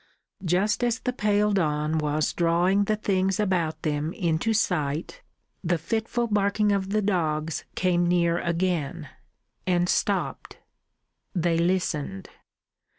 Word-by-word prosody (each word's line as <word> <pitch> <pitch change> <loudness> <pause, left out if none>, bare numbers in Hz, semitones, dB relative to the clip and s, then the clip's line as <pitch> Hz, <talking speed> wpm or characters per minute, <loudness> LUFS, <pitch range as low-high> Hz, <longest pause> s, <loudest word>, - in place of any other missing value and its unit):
Just 190 +7 +1
as 240 -1 +1
the 250 -1 -3
pale 210 -2 +2
dawn 155 -4 +1
was 150 0 0
drawing 175 +4 +2
the 215 - +1
things 195 -1 0
about 180 -6 0
them 150 +1 -1
into 170 +3 0
sight, 175 - -1 0.4
the 175 -1 +1
fitful 225 +7 -1
barking 210 -1 +1
of 195 -1 0 0.2
dogs 160 -5 -1
came 175 -1 +2
near 170 -1 +2
again, 170 -3 -1 0.6
and 175 -1 +2
stopped. - - -1 0.8
They 170 -1 +1
listened. 170 - -1
175 Hz, 115 wpm, -26 LUFS, 160-200 Hz, 0.8 s, pale